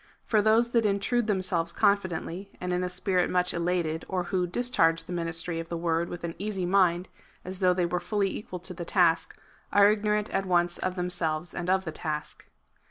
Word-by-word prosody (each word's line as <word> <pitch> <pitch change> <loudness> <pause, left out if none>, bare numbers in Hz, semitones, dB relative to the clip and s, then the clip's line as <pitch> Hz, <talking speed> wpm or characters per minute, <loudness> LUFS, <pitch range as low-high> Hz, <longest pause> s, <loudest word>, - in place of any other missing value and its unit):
For 215 -2 +3
those 225 +3 +3
that 235 -1 +3
intrude 210 +3 +1
themselves 185 -4 +1
confidently, 195 -2 0
and 180 0 -2
in 180 0 0
a 180 - -1
spirit 180 0 0
much 180 0 +1
elated, 170 -2 -1
or 185 -1 -1
who 180 0 -1
discharge 170 -6 +2
the 180 - -7
ministry 165 0 -2
of 165 0 -6
the 170 - -3
word 165 0 0
with 175 - -7
an 170 -1 -3
easy 195 -2 -2
mind, 180 -1 +2 0.4
as 185 +1 -6
though 180 -2 +3
they 180 -1 +1
were 175 +1 -1
fully 200 +1 -1
equal 185 -3 -6
to 185 +1 -5
the 175 0 -6
task, 170 -1 +2 0.3
are 205 0 +6
ignorant 210 0 0
at 195 0 -1
once 175 -1 +2
of 185 0 -2
them 180 -1 -2
selves 160 0 -1
and 175 0 -4
of 190 0 +2
the 160 - -3
task. 155 -1 -5
180 Hz, 205 wpm, -27 LUFS, 170-200 Hz, 0.4 s, are